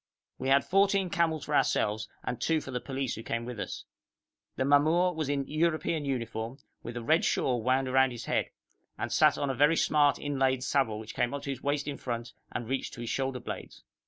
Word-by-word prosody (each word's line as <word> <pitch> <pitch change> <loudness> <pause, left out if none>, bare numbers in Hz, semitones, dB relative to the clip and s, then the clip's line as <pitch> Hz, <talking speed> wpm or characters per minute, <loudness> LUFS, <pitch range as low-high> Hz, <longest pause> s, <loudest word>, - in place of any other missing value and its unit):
We 130 - -3
had 140 +1 +5
fourteen 195 -1 +3
camels 160 -3 +1
for 150 - -1
ourselves 105 -5 +1
and 125 - -4
two 160 -1 +2
for 135 - -8
the 125 - -2
police 135 -2 -3
who 110 - -6
came 115 +1 -3
with 120 -3 -6
us. - - -5 0.7
The 130 - 0
mamour 160 +6 +4
was 155 -3 -2
in 140 -1 -1
European 155 -1 0
uniform, 115 -2 -3 0.2
with 120 +1 -6
a 120 - -5
red 155 +7 +3
shawl 125 -3 +1
wound 130 +2 +1
round 130 0 +5
his 120 - -7
head, - - 0 0.5
and - - -3
sat - - +4
on 140 -1 0
a - - -2
very 145 +5 +4
smart 145 -2 +3
inlaid 135 -3 0
saddle 130 -5 +1
which 110 0 -8
came 125 +3 0
up 140 - -6
to 140 - -3
his 135 -1 -6
waist 145 0 -1
in 140 -1 -3
front 120 -1 -4 0.2
and 120 - -4
reached 135 +2 -2
to 120 - -8
his 120 - -3
shoulder 135 -1 -1
blades. - - -8
135 Hz, 215 wpm, -29 LUFS, 125-150 Hz, 0.7 s, had